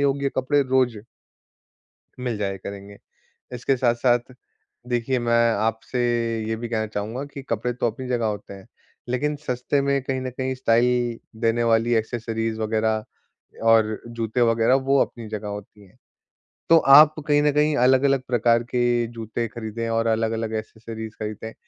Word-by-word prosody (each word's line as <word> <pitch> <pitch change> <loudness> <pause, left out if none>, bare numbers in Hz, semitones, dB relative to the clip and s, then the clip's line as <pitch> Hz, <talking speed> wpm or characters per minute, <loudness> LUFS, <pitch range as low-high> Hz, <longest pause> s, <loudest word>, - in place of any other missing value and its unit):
योग्य 140 0 +1
कपड़े 140 +2 +2
रोज़ 130 -3 +1 1.2
मिल 125 -3 -2
जाया 100 -2 -2
करेंगे। 100 +1 -9 0.6
इसके 125 +2 0
साथ-साथ 120 0 +1 0.5
देखिए, 125 +1 0
मैं 115 0 +3
आपसे 115 +4 -2 0.5
ये 110 - -1
भी 115 +1 -6
कहना 110 -2 -1
चाहूँगा 110 +5 -4
कि 140 - -6
कपड़े 115 +2 -1
तो 120 - -1
अपनी 130 +4 -8
जगह 120 -2 0
होते 105 -2 -4
हैं, 95 -1 -12 0.4
लेकिन 145 +4 0
सस्ते 125 +3 0
में 140 0 +1
कहीं 130 0 -2
न 130 - -3
कहीं 130 +1 -3
स्टाइल 120 -1 +1 0.2
देने 115 0 +2
वाली 115 +1 +2
एक्सेसरीज 115 0 -2
वगैरह 110 0 0 0.7
और 110 -1 +3
जूते 115 +1 -2
वगैरह, 115 +1 +3
वो 135 +1 +2
अपनी 115 -2 -3
जगह 105 -1 -5
होती 105 0 -8
हैं। - - -26 0.7
तो 165 - +8 0.2
आप 155 0 +7
कहीं 145 -1 +4
न 150 - +3
कहीं 150 +1 +2
अलग-अलग 130 +1 +3
प्रकार 120 -1 +2
के 120 -1 +1
जूते 115 0 -4
खरीदें 115 0 -5
और 115 0 0
अलग-अलग 110 0 -1
एक्सेसरीज 110 0 -7
खरीदें। 110 +1 -6
115 Hz, 150 wpm, -23 LUFS, 110-130 Hz, 1.2 s, तो